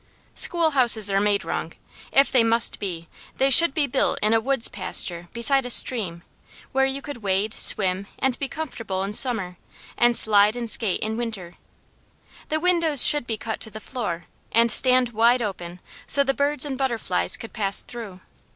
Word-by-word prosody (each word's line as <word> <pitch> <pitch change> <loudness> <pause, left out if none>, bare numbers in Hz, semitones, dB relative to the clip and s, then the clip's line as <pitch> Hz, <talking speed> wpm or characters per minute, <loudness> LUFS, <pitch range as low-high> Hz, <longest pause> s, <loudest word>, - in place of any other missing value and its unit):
Schoolhouses 260 - +3
are 195 - +1
made 205 -1 -1
wrong. - - -5 0.4
If 275 +1 +2
they 250 -4 +2
must 230 0 -1
be, 170 -4 -7 0.3
they 270 +1 +1
should 330 +4 +7
be 305 - +1
built 270 0 -1
in 215 +1 +1
a 225 - +3
woods 265 0 +1
pasture 175 -3 -3
beside 270 +3 +2
a 245 - -7
stream, 195 -9 +1 0.5
where 270 0 0
you 270 +1 -5
could 290 -3 -8
wade, 205 0 -2
swim, 190 0 +2
and 265 -2 -1
be 275 - -4
comfortable 230 -11 -6
in 200 +1 -6
summer, 210 -8 -1 0.4
and 240 0 +2
slide 210 0 +4
and 235 -2 -4
skate 205 -6 0
in 220 +1 -4
winter. 215 -7 -7 1.0
The 310 - -2
windows 335 -5 +3
should 295 -5 +3
be 225 - -4
cut 220 +1 -6
to 220 - -6
the 215 - -10
floor, 205 -8 -6 0.3
and 230 0 +2
stand 255 -1 +5
wide 235 +2 +1
open, 180 -4 -7 0.3
so 280 - +4
the 270 0 -1
birds 285 0 -1
and 270 -2 -6
butterflies 230 - -2
could 225 - -11
pass 200 -3 0
through. 210 -6 -11
230 Hz, 180 wpm, -22 LUFS, 200-265 Hz, 1.0 s, should